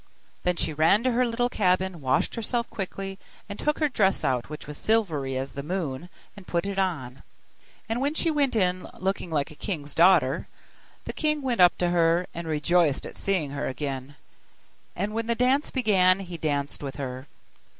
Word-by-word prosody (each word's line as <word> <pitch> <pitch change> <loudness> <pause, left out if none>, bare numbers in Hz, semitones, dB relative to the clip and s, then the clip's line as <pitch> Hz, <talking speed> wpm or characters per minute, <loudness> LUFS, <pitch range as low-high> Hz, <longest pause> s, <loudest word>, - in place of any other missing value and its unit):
Then 180 0 +1
she 160 -1 -1
ran 160 +9 +4
to 255 - +2
her 245 +1 +2
little 240 +1 0
cabin, 185 -5 0
washed 130 -1 +1
herself 235 +1 -1
quickly, 195 0 -5 0.3
and 200 0 -7
took 300 0 0
her 305 - +2
dress 200 -8 +2
out 125 -1 0
which 150 - -7
was 150 - -6
silvery 155 -12 0
as 135 +1 -3
the 140 - -5
moon, 165 -1 -3 0.3
and 200 -3 -13
put 170 +1 -1
it 200 -1 -2
on; 140 -9 -2 0.7
and 225 +3 -1
when 285 +3 0
she 330 0 +2
went 285 -5 +1
in, 185 -3 +1
looking 190 -1 -2
like 150 -3 -1
a - - -12
king's 150 -3 -4
daughter, 165 -5 +4 0.6
the - - -4
king 305 -2 0
went 245 -7 +1
up 175 -1 +6
to 175 -1 +1
her, 170 0 +3
and 170 0 -6
rejoiced 155 -1 +2
at - - -8
seeing 180 -8 0
her 140 - -3
again, 135 0 -4 0.8
and 200 +3 -2
when 225 0 -2
the 235 - +1
dance 260 +5 +2
began 195 -7 +3
he 180 -2 -7
danced 145 -3 -2
with 140 -2 -5
her. 130 0 -5
180 Hz, 190 wpm, -26 LUFS, 150-215 Hz, 0.8 s, up